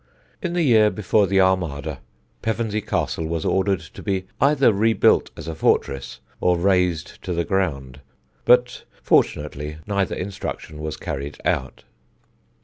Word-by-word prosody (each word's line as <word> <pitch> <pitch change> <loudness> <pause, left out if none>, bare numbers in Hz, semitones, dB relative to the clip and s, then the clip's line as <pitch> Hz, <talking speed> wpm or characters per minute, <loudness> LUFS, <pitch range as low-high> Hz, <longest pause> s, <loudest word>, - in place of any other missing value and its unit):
In 180 -4 -2
the 175 -1 +1
year 110 -6 +5
before 105 0 +1
the 95 0 +2
Armada, 80 -7 0 0.4
Pevensey 110 -1 -1
Castle 85 -5 -2
was 80 -1 -3
ordered 95 -1 +1
to 85 - -12
be 95 -2 -2 0.2
either 140 -4 +4
rebuilt 110 +1 +3
as 80 - -8
a 80 - -3
fortress 70 -4 0 0.2
or 90 -1 +2
razed 90 -2 0
to 90 - -3
the 85 0 -1
ground; 70 -9 -2 0.4
but 125 0 +3 0.2
fortunately 75 0 +1
neither 100 -2 -1
instruction 90 -5 -6
was 75 0 -4
carried 75 -4 -5
out. 65 0 -1
95 Hz, 140 wpm, -22 LUFS, 80-105 Hz, 0.4 s, year